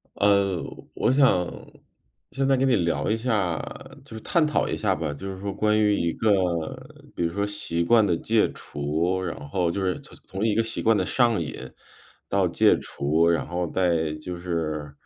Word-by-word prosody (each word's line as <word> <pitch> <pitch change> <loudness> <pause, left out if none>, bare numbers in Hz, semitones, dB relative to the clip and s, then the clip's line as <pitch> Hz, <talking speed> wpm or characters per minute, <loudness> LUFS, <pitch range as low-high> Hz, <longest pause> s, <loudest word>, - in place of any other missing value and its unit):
呃， 100 -3 +2 0.3
我 - - +2
想 130 -10 +4 0.8
现 135 0 -1
在 135 -1 +3
跟 135 - +2
你 130 - +4
聊 80 -6 0
一 110 - +2
下， 105 -8 0 0.5
就 - - -11
是 110 - -7
探 170 -3 +2
讨 150 - +1
一 - - -1
下 100 -3 0
吧。 80 -4 -3
就 95 +7 -7
是 95 - -10
说， 100 0 -4
关 105 +1 +2
于 105 -1 +3
一 85 -4 0
个 110 - +1 0.8
比 - - -2
如 85 0 -1
说 100 +2 0
习 95 -5 -2
惯 110 +5 +5
的 90 - +2
戒 110 +5 +1
除， 80 +6 -2
然 85 -5 -5
后 90 +2 0
就 100 +4 -2
是 95 -1 -1
从 - - -14
从 95 +3 -3
一 105 - +1
个 115 - +3
习 115 - -4
惯 115 -1 +3
的 - - 0
上 120 -5 +2
瘾 80 - -6 0.6
到 - - +2
戒 - - +4
除， 80 +4 0
然 85 - +1
后 90 0 -2
再 85 -3 0
就 85 +3 -7
是 80 -4 -3
95 Hz, 210 characters per minute, -25 LUFS, 85-110 Hz, 0.8 s, 惯